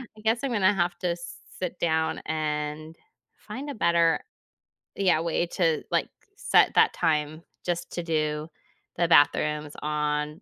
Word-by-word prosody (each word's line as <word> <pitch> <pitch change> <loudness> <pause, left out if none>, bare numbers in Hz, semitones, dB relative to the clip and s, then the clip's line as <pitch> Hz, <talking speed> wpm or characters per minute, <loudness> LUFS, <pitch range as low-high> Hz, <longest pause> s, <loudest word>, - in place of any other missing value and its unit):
I 215 - -14
guess 225 +2 +2
I'm 275 - -1
gonna 205 -3 +3
have 175 -1 0
to 180 - -1
s 170 0 -7 0.2
sit 180 -1 -4
down 160 -1 0
and 155 0 -3 0.5
find 265 +8 -6
a 285 - -5
better 170 -4 +3 0.7
yeah, 185 -5 +2
way 170 +1 0
to, 165 -3 0
like, - - +1 0.3
set - - +3
that - - +5
time 155 -1 0 0.2
just 175 -1 -2
to 175 - -3
do 155 -1 -1 0.5
the 170 - +2
bathrooms 150 -1 +3
on 150 +2 -2
165 Hz, 150 wpm, -26 LUFS, 150-175 Hz, 0.7 s, that